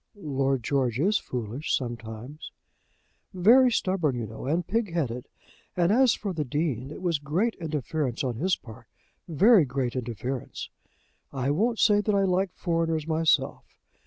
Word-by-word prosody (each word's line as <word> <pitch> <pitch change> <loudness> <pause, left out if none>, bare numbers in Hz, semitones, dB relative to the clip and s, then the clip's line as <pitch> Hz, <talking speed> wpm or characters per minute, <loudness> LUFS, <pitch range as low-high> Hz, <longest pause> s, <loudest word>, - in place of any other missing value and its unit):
"Lord 135 - -1
George 125 -2 0
is 200 +7 +2
foolish 125 +4 -2
sometimes." 120 +3 -7 0.8
"Very 245 +8 +6
stubborn, 185 - 0
you 120 -2 -3
know, 110 +4 -8
and 165 +4 0
pigheaded. 170 - -2 0.5
And 175 +1 +3
as 250 +1 +4
for 200 -2 -4
the 155 -3 -1
Dean, 135 -2 -2
is 150 - -8
was 170 -5 -1
great 175 +11 0
interference 150 -5 -2
on 125 -4 -2
his 185 +7 +1
part, 115 0 -13 0.4
very 190 - +5
great 125 -2 -2
interference. 125 +1 -5 0.6
I 135 0 -1
won't 225 +10 +1
say 210 -2 +4
that 210 0 0
I 195 - +3
like 190 0 +1
foreigners 165 -2 -1
myself. 160 0 +1
155 Hz, 145 wpm, -27 LUFS, 125-185 Hz, 0.8 s, Very